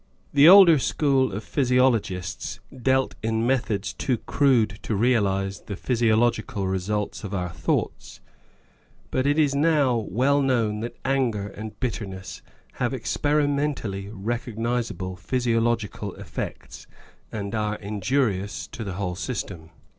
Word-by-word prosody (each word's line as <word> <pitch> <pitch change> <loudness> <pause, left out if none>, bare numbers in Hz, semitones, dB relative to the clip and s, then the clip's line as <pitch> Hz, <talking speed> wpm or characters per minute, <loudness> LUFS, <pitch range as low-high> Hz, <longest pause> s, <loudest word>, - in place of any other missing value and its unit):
The 145 +3 +8
older 180 -5 +9
school 135 -1 +1
of 105 +3 -5
physiologists 125 -9 0 0.2
dealt 130 +1 +1
in 110 +1 0
methods 115 -6 0
too 125 -3 -1
crude 115 -7 +2
to 110 - -2
realise 100 -4 +1
the 100 - -7
physiological 115 -3 +1
results 100 +2 -2
of 100 -1 -4
our 90 -2 -2
thoughts, - - -2 0.9
but 130 +1 +1
it 145 +1 +2
is 145 -3 +3
now 145 -3 +3
well 130 +7 +1
known 115 -6 +1
that 120 +2 -6
anger 120 -7 0
and 110 +2 -9
bitterness 100 -6 -5 0.4
have 125 +1 +1
experimentally 140 -7 -1
recognisable 115 -2 -3
physio 120 +2 0
logical 110 -4 -2
effects, 100 -5 -7 0.4
and 100 -2 -4
are 105 -1 -1
injurious 105 0 -1
to 115 - -6
the 100 -3 -5
whole 90 -1 -3
system. 90 -5 -5
115 Hz, 125 wpm, -25 LUFS, 100-130 Hz, 0.9 s, older